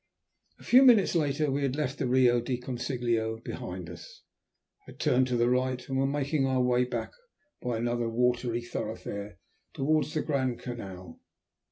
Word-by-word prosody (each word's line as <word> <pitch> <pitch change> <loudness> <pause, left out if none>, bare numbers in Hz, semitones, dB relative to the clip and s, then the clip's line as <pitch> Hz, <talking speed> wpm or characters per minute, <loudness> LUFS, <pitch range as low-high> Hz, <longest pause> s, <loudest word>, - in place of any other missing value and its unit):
A - - -17
few 255 +2 +6
minutes 240 -7 +6
later 150 -3 +1
we 140 +2 -1
had 135 -1 0
left 145 -2 -2
the 135 - 0
Rio 125 -1 +4
del 125 +1 -2
Consiglio 120 -3 -2
behind 90 -6 -6
us, 85 -1 -12 0.6
had - - -12
turned 130 +1 +3
to 125 -1 0
the 120 0 +3
right, 125 0 0
and 135 - -3
were 135 +1 +2
making 145 +1 0
our 130 -1 +1
way 125 0 +2
back 125 - -4 0.5
by 120 -2 -2
another 120 0 -1
watery 120 0 0
thoroughfare 100 -3 -5 0.4
towards 155 +2 +1
the 155 - 0
Grand 130 -5 0
Canal. 95 -9 -8
125 Hz, 165 wpm, -29 LUFS, 120-135 Hz, 0.6 s, few